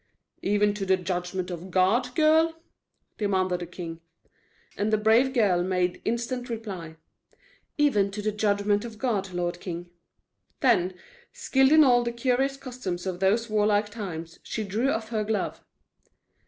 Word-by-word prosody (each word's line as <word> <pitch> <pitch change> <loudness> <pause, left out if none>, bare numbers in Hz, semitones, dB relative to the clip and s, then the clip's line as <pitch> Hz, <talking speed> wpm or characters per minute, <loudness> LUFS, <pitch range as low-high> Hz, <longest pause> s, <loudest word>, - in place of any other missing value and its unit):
"Even 205 +1 +2
to 205 -1 -4
the 190 -1 +3
judgment 180 0 -3
of 175 +2 -7
God, 220 +8 +2
girl?" 320 +1 +4 0.6
demanded 185 -3 +1
the 175 - -6
king. 165 -1 -7 0.7
And 210 +1 -1
the 215 - +4
brave 225 +5 +4
girl 205 -9 +3
made 180 0 0
instant 245 +2 -2
reply: 195 -8 -6 0.8
"Even 255 -10 +3
to 205 +1 -5
the 215 - +1
judgment 205 0 +1
of 230 -2 -8
God, 205 -6 -1
lord 175 0 -2
king." 175 -1 -6 0.7
Then, 185 -8 +3 0.4
skilled 275 - +2
in 310 0 +8
all 245 -3 +5
the 235 - -2
curious 260 +3 0
customs 245 -10 -5
of 185 -2 -3
those 210 +5 +2
warlike 210 -1 +2
times, 170 -7 -6
she 220 - -4
drew 215 +7 0
off 220 -4 -2
her 220 -2 -1
glove. 215 0 -2
210 Hz, 150 wpm, -26 LUFS, 185-235 Hz, 0.8 s, in